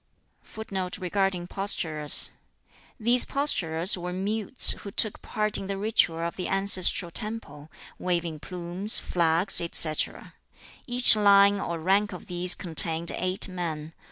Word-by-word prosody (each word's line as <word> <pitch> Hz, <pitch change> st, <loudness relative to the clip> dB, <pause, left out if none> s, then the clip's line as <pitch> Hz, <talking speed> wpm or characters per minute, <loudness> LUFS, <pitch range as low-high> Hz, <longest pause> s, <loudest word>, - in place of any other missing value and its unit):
] -, -, -45 dB
[Footnote 190 Hz, -4 st, -7 dB
5: 180 Hz, -4 st, +1 dB, 0.7 s
These 240 Hz, +2 st, +4 dB
posturers 180 Hz, -, 0 dB
were 180 Hz, -1 st, -7 dB
mutes 205 Hz, +6 st, +4 dB
who 205 Hz, -, -5 dB
took 210 Hz, +1 st, -3 dB
part 215 Hz, -1 st, -4 dB
in 195 Hz, -, -8 dB
the 195 Hz, 0 st, -5 dB
ritual 205 Hz, -5 st, 0 dB
of 170 Hz, 0 st, -5 dB
the 185 Hz, -, -5 dB
ancestral 195 Hz, -2 st, +1 dB
temple, 165 Hz, -8 st, -7 dB, 0.3 s
waving 170 Hz, -3 st, -3 dB
plumes, 180 Hz, +5 st, -3 dB
flags, 170 Hz, +3 st, 0 dB
etc. 165 Hz, -2 st, -1 dB, 0.5 s
Each 245 Hz, -2 st, +4 dB
line 200 Hz, -1 st, +3 dB
or 170 Hz, -3 st, -5 dB
rank 195 Hz, +4 st, 0 dB
of 180 Hz, -, -11 dB
these 180 Hz, 0 st, +1 dB
contained 165 Hz, -1 st, +2 dB
eight 185 Hz, +2 st, -2 dB
men. 165 Hz, -4 st, -6 dB
185 Hz, 130 wpm, -25 LUFS, 170-200 Hz, 0.7 s, These